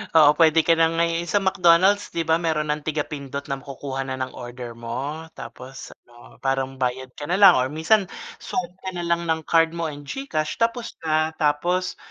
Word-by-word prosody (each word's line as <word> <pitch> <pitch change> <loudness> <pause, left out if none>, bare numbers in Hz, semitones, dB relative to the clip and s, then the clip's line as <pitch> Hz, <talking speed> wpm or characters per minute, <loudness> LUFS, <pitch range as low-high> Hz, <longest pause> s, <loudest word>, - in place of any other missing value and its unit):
Oo, 155 -2 +8
puwede 165 -1 +5
ka 165 - +4
na 165 - +5
ngayon 170 +1 0
sa 205 +4 +1
McDonald's 190 +1 +4
'di 170 - 0
ba 160 - +5
mayro'n 155 -3 -1
ng 150 0 -1
tiga-pindot 145 -2 -4
na 135 - -1
makukuha 135 -1 -6
na 130 0 -4
ng 130 0 -4
order 120 -1 -8
mo. 135 +7 -5
Tapos 130 +1 -10 0.2
ano 120 0 -17
parang 135 0 -1
bayad 130 0 -2
ka 145 - -6
na 180 +5 0
lang 190 -6 +9
or 130 +1 +1
minsan 195 +7 +3 0.3
swipe 245 -7 -4
ka - - -1
na 175 - -4
lang 170 0 0
ng 160 -1 0
card 165 0 +4
mo 170 -1 -2
and 145 -1 -9
GCash 155 - -3
tapos 230 0 0
na. 155 0 0
Tapos 175 +5 0
155 Hz, 195 wpm, -23 LUFS, 135-170 Hz, 0.3 s, lang